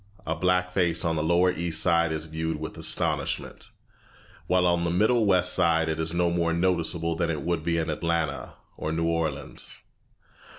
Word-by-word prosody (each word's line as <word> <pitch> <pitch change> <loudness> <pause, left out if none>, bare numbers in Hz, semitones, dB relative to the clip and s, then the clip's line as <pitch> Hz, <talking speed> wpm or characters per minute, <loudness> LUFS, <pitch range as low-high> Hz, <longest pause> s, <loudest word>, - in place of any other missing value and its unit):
A 80 - -1
black 90 +2 +1
face 85 -3 0
on 80 -1 +1
the 80 - 0
lower 85 +3 +3
East 85 -2 -1
Side 85 -2 +2
is 80 0 -3
viewed 80 +1 -3
with - - -6
astonishment, - - -2 0.8
while 90 0 +2
on 85 -1 +2
the 85 - 0
middle 110 +5 +2
West 90 -2 +3
Side 80 -2 +2
it 80 0 -2
is 80 0 0
no 85 0 +1
more 85 -1 0
noticeable 85 -1 0
than 85 0 -1
it 75 -4 -3
would 85 -2 -1
be 85 0 0
in 80 - -1
Atlanta 80 -2 -2 0.2
or 75 - -3
New 80 +1 -1
Orleans. 80 -4 -3
85 Hz, 180 wpm, -26 LUFS, 80-90 Hz, 0.8 s, lower